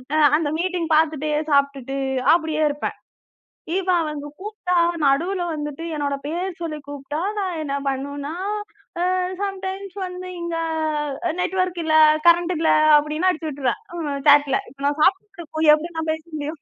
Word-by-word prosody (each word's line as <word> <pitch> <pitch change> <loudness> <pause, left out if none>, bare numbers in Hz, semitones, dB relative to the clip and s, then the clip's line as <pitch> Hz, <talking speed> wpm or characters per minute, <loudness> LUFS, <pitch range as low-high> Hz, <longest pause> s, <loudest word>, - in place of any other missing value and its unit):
அ - - +3 0.2
அந்த 310 -3 -1
மீட்டிங் 355 -2 -1
பார்த்துட்டே 310 -1 +1 0.2
சாப்பிட்டுட்டு, 275 -1 +1 0.3
அப்படியே 315 -2 +1
இருப்பேன். 290 +1 -4 0.8
இப்ப 380 -1 0
அவங்க 300 -2 -4
கூப்ட்டா, 410 -4 -2 0.3
நடுவுல 345 +7 +2
வந்துட்டு 295 +1 -5
என்னோட 285 -1 -1
பேர் 355 +4 -2
சொல்லிக் 305 -4 -5
கூப்ட்டா, 285 +1 -5 0.2
நான் 370 -4 -2
என்ன 280 -2 -3
பண்ணுனா, 285 +2 -4 0.8
அ - - +1 0.3
சம்டைம்ஸ் 390 0 -4
வந்து 365 0 -7
இங்க 340 -1 -3 0.7
அ - - -1
நெட்வொர்க் 365 -1 -1
இல்ல, 315 0 +3 0.3
கரண்ட் 345 +1 +4
இல்ல. 320 - +2 0.3
அப்படின்னு 305 +5 0
அடிச்சுவிட்ருவேன். 290 - -2 0.2
ம், 285 -3 -3
சாட்ல. 285 -1 +6 0.3
நான் 290 +1 0
சாப்பிட்டுட்டு 390 +1 +1
இருக்கும்போது 315 -1 +2
எப்படி 335 +3 -4
நான் 320 0 -1
பேச 315 - -5
முடியும்? 300 0 -5
315 Hz, 140 wpm, -22 LUFS, 290-360 Hz, 0.8 s, சாட்ல